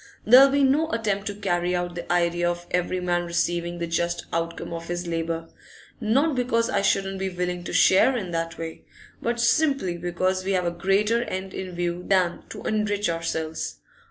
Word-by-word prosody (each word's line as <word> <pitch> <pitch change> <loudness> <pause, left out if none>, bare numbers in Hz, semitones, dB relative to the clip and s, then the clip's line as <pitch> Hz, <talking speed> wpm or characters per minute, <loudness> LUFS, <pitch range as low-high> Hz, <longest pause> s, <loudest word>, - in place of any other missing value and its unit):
There'll 255 +5 +8
be 280 +1 +2
no 295 +4 +3
attempt 205 -5 -1
to 205 - -3
carry 180 -3 0
out 175 0 -2
the 175 0 -6
idea 175 0 +2
of 175 0 -4
every 180 +1 0
man 175 -1 0
receiving 170 0 -1
the 170 - -2
just 170 +1 -1
outcome 165 0 -3
of 165 0 -6
his 175 0 -3
labour; 165 -1 -3 0.5
not 270 +8 +2
because 235 -2 +1
I 200 - +1
shouldn't 195 -1 +1
be 190 0 -1
willing 180 -1 -3
to - - -5
share 250 +7 +5
in 190 -6 -4
that 165 0 -3
way, 165 -1 -7 0.4
but 235 0 -1
simply 235 - +2
because 185 +2 -1
we 195 +1 -1
have 180 -1 +1
a 170 - +1
greater 200 +6 +1
end 190 0 -5
in 185 -2 -6
view 175 0 -2
than 185 -3 +2
to - - -8
enrich 205 -3 0
ourselves. 160 -1 -3
180 Hz, 185 wpm, -25 LUFS, 175-205 Hz, 0.5 s, There'll